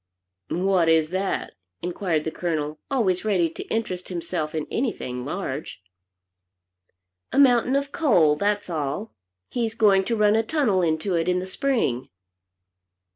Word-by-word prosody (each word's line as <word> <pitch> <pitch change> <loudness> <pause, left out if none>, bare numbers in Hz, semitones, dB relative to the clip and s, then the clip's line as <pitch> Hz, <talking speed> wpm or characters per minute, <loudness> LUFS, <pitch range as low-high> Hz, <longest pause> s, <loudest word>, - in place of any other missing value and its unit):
"What 180 -2 +2
is 160 0 +3
that?" 190 +1 -2 0.3
inquired 175 -3 -1
the 160 - -3
Colonel, 155 -3 -3
always 200 -10 +1
ready 185 -6 +1
to - - -7
interest 185 -5 -3
himself 170 -3 -3
in 155 -2 -1
anything 125 - -2
large. 145 - -5 1.5
"A - - -2
mountain 255 -1 +5
of 280 0 -1
coal; 180 - +4
that's 205 +5 0
all. 160 +5 -3 0.4
He's 230 -2 -1
going 200 -4 +4
to 235 - 0
run 210 -1 +4
a 225 - +4
tunnel 225 -7 +1
into 165 +3 0
it 170 +1 +1
in 180 - +2
the 180 - -2
Spring." 190 - -1
185 Hz, 140 wpm, -24 LUFS, 160-220 Hz, 1.5 s, mountain